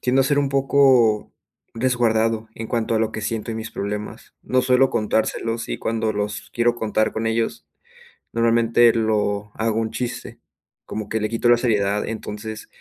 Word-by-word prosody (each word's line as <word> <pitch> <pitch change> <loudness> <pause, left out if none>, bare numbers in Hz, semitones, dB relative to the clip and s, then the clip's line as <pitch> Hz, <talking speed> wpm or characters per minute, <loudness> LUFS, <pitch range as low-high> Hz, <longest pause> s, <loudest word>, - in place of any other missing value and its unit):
tiendo 130 +2 +3
a - - -1
ser 145 +1 +2
un 140 - 0
poco 135 -5 +3 0.4
resguardado 115 -2 +1
en 115 - -5
cuanto 115 -1 -1
a - - +2
lo 110 0 0
que - - -4
siento 110 +1 -3
y - - -5
mis 110 0 -5
problemas. 105 0 -6
No 130 - +1
suelo 130 +1 +3
contárselos, 115 +1 -1
y - - -3
cuando 110 -1 -1
los 105 0 -4
quiero 120 0 +2
contar 110 -2 0
con 110 0 -1
ellos, 115 0 -1 0.7
normalmente, 115 0 +4
lo 105 -2 0
hago 110 0 -1
un 110 -1 -2
chiste, 125 -2 -5 0.5
como 110 -1 -5
que 110 - -1
le 110 0 -1
quito 115 +2 +1
la 120 - +6
seriedad, 105 -4 +1
entonces 110 0 -6
115 Hz, 175 wpm, -22 LUFS, 110-120 Hz, 0.7 s, la